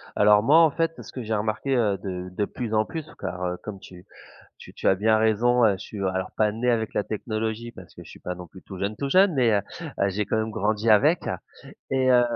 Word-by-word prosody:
Alors 105 0 +5
moi 150 +6 +5
en 160 -3 +5
fait 165 +1 0
parce - - -11
que 125 - -6
j'ai 110 0 -3
remarqué, 110 +6 -1
heu, 105 -5 +2
de 90 -2 -6
de 105 +3 -1
plus 115 +1 -5
en 110 0 +3
plus, 160 +3 -6
car 90 +1 -5
heu, 90 0 -2
comme 105 -2 -7
tu 90 0 -14 0.5
tu - - -13
tu - - -6
as - - +5
bien 110 +3 +2
raison 115 +3 +3
heu, 105 - +5
je - - -3
suis, 105 - -9
alors, 95 -1 -2
pas 105 -1 +2
né 125 +3 0
avec 110 -2 -1
la - - +1
technologie 110 +2 -4
parce 90 -5 -14
que - - -11
je - - -13
suis - - -13
pas 90 - -4
non 90 -1 -9
plus 95 +3 -15
tout 95 - -10
jeune, 100 +2 -2
tout 140 - -3
jeune 185 +2 +4
mais 125 -4 +3
heu, 100 - +3 0.4
heu 100 - +3
j'ai 105 +2 -1
quand - - -1
même 110 0 -1
grandi 110 0 -1
avec 150 +11 +4 0.7
et 130 -1 +2
heu 125 -1 +6
110 Hz, 255 wpm, -25 LUFS, 100-120 Hz, 0.7 s, heu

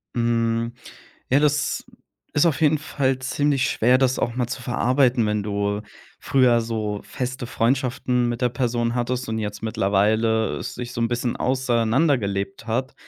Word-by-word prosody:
Mhm, 115 0 0 0.6
ja, 135 +3 +4
das 150 0 +1 0.5
ist 145 +4 +4
auf 155 - +1
jeden 155 0 +4
Fall 135 -3 -1
ziemlich 135 +1 0
schwer, 125 +3 +3
das 130 -1 +2
auch 120 - -1
mal 125 -2 0
zu 125 +1 -6
verarbeiten, 125 -1 +2
wenn 105 -1 0
du 100 0 -2 0.4
früher 125 -3 +3
so 110 -3 -3
feste 125 -1 -5
Freundschaften 125 0 0
mit 120 +1 -3
der 125 - +3
Person 120 -1 -1
hattest 125 0 -2
und 110 - -2
jetzt 105 -1 -4
mittlerweile 110 +2 +1
sich 120 0 -6
so 120 - -4
'n 115 - +2
bisschen 120 0 -1
auseinandergelebt 115 -5 0
hat 125 +4 -2
120 Hz, 150 wpm, -23 LUFS, 110-130 Hz, 0.6 s, ja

